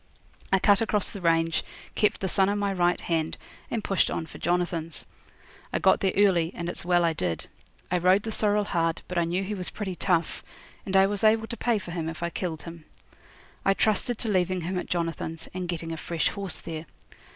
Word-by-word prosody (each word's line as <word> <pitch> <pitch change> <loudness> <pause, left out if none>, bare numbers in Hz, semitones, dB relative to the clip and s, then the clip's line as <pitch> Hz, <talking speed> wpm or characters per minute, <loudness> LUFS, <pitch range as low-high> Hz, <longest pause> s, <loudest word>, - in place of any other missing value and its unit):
I 195 - +6
cut 200 +2 +4
across 210 -3 0
the 200 - -8
range, 165 -1 +2 0.3
kept 210 - +1
the 190 - 0
sun 190 +1 +3
on 205 - 0
my 200 -1 0
right 175 -1 +2
hand, 160 -2 -1 0.3
and 225 - -2
pushed 195 - +2
on 160 - -2
for - - -12
Jonathan's. 175 -2 -1 0.7
I - - +1
got - - +4
there 190 -2 +2
early, 180 -5 +4
and 170 - -4
it's - - -5
well 175 0 +3
I 165 - +2
did. 90 - -2 0.5
I 180 - +2
rode 185 +3 +4
the 225 - -3
sorrel 210 -1 +2
hard, 165 -4 0
but 180 -1 -1
I 170 - +2
knew 180 +3 -1
he 200 +2 -3
was 185 -3 -2
pretty 195 -4 -4
tough, 170 -3 0 0.4
and 195 0 +3
I 190 - +7
was 205 +2 -1
able 220 +1 +4
to 235 - -5
pay 235 -1 +1
for 185 -4 -7
him 165 -2 -2
if 165 +1 -6
I 170 - -1
killed 165 -4 -4
him. 165 -2 -10 0.8
I 195 - +3
trusted 220 +3 +1
to 225 - -2
leaving 185 -2 +1
him 180 +2 -2
at - - -5
Jonathan's, 165 -1 -2
and 180 -1 -4
getting 165 -1 -3
a 165 - -4
fresh 170 +1 0
horse 200 -3 -2
there. 160 -1 -6
180 Hz, 220 wpm, -27 LUFS, 165-200 Hz, 0.8 s, I